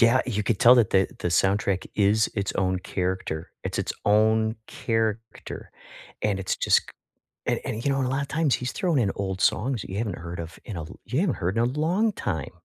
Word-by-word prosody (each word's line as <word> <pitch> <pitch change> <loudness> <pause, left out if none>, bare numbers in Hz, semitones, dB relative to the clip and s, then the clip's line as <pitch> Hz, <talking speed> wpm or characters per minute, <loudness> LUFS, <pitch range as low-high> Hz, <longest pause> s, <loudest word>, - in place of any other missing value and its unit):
Yeah, 115 +2 +6
you 105 -4 -1
could 100 0 0
tell 120 +5 +8
that 115 -5 +4
the 95 -1 +4
the 90 - 0
soundtrack 95 +1 +1
is 105 +2 +3
its 100 -2 -1
own 95 -1 +1
character, 90 -4 -3
it's - - -3
its - - -1
own 110 +2 +3
character, 115 0 -3 0.5
and 100 -2 +1
it's 95 - -1
just - - +4
c - - -20 0.6
and - - +1
and, 110 +1 -3
you 140 - +3
know 135 - +1
and 130 - +1
a - - -1
lotta 140 +1 -1
times 155 -4 +2
he's 125 0 -3
thrown 170 -7 +1
in 100 -5 +2
old 95 -1 -3
songs 120 -1 +1
that - - -9
you 95 - -4
haven't 105 -4 -2
heard 85 +1 -6
of 80 0 -7
in 100 -6 -6
a 80 - -4 0.2
you 130 - -1
haven't 175 -10 +1
heard 95 +3 -2
in 115 - +3
a - - +3
long 170 - +1
time. 80 - -3
110 Hz, 225 wpm, -26 LUFS, 95-125 Hz, 0.6 s, tell